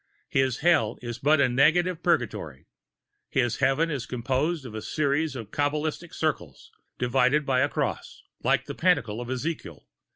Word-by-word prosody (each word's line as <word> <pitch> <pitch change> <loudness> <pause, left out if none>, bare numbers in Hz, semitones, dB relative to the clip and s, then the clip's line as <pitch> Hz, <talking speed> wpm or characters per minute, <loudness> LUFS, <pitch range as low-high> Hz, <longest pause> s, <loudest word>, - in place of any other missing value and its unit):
His 130 -2 +1
Hell 150 -10 +3
is 120 0 -5
but 150 +2 +3
a 140 - +5
negative 160 +7 +3
Purgatory. 120 - -1 0.6
His 120 -3 +1
Heaven 160 +5 +2
is 135 -5 -4
composed 135 +6 -1
of 120 - -8
a 110 - -5
series 145 +2 0
of 110 -4 -7
Kabalistic 150 +3 -2
circles, 85 - -3 0.3
divided 130 +4 +2
by 130 -2 +2
a 140 +2 +2
cross, - - -3 0.2
like - - +2
the - - -6
Pantacle 130 - +1
of 120 - -7
Ezekiel. 140 +5 -4
135 Hz, 155 wpm, -26 LUFS, 120-155 Hz, 0.6 s, a